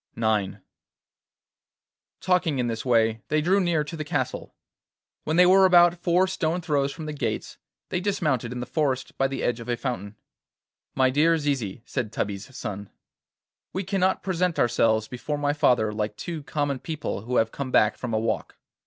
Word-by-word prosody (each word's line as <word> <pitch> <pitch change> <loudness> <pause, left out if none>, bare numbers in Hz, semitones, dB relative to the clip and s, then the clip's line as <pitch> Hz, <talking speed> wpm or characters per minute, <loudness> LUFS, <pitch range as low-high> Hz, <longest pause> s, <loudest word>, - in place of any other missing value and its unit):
IX 110 -4 +1 1.7
Talking 175 -5 +1
in 125 - 0
this 115 -1 -3
way 115 -3 +2
they 155 - +1
drew 185 +6 +3
near 170 -4 +1
to 155 +3 -7
the 155 - -4
castle. 145 -4 -3 0.7
When 155 - 0
they 180 +1 +7
were 190 +2 +6
about 175 -2 +5
four 175 +2 +3
stone 175 -2 -1
throws 145 -4 0
from 160 +1 -8
the 150 - -4
gates 145 - -4 0.3
they 180 - -1
dismounted 155 - -1
in 125 0 -4
the - - -3
forest, 135 -4 -1
by 135 - +3
the 135 - -4
edge 120 0 0
of 115 +1 -8
a 120 - 0
fountain. 110 -5 -4 0.8
'My 130 -1 +3
dear 160 +4 +3
Zizi,' 130 -8 -2
said 120 -6 -3
Tubby's 105 +3 -4
son, 100 -4 -5 0.8
'we 190 - -2
cannot 190 0 0
present 180 -2 0
ourselves 110 -2 +2
before 130 +4 -4
my 145 0 0
father 120 -7 +2
like 105 0 -2
two 170 -3 -5
common 145 -3 -1
people 155 - -4
who 125 +4 -4
have 115 -1 +2
come 140 -2 -4
back 110 -3 +3
from 125 - -5
a 110 - +1
walk. 110 0 -2
140 Hz, 180 wpm, -25 LUFS, 115-165 Hz, 1.7 s, they